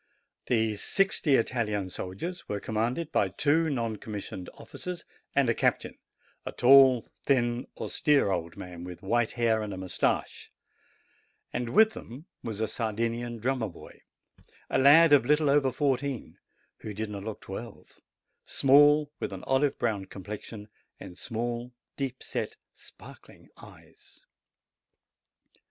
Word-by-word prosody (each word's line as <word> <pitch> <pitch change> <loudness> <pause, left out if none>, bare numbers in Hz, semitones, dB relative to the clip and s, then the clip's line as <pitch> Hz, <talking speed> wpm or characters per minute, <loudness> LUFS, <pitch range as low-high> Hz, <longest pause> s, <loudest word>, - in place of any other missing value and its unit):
The 110 -3 +2
sixty 185 - +2
Italian 105 -6 -1
soldiers 165 - -6
were 105 - -2
commanded 120 +10 -2
by 95 - +2
two 155 - +2
non 115 -6 -2
commissioned 100 -3 -7
officers 180 -1 -8 0.3
and 140 -2 +4
a 115 - +3
captain, - - -1 0.4
a - - -5
tall, 130 -2 +6 0.2
thin, 120 -2 +1
austere 145 -9 +2
old 85 -2 -3
man, 90 -1 -8
with 90 0 -9
white 120 +3 +1
hair 115 -2 +1
and 100 -3 -5
moustache; 95 -1 -2 1.0
and 120 -1 -2
with 220 - +5
them 130 +7 -10 0.2
there - - -5
was 110 -1 -5
a 110 - +1
Sardinian 115 +2 -2
drummer 120 -1 -1
boy, 85 - -14 0.7
a - - +2
lad 145 +4 +7
of 140 - +6
a - - -8
little 150 -1 +3
over 140 -2 +3
fourteen, 135 -1 -2 0.4
who 105 -2 -8
did 110 0 -4
not 100 -1 -6
look 110 0 -6
twelve, 110 +5 -9 0.4
small, 145 +2 +5
with - - -3
an 95 -1 -7
olive 135 +1 +1
brown 105 -5 -1
complexion, 105 +2 -8 0.3
and 90 - -10
small, 120 +3 -4 0.2
deep 135 -2 -4
set, - - -4 0.2
sparkling - - -15
eyes. - - -17
120 Hz, 135 wpm, -28 LUFS, 105-140 Hz, 1.0 s, lad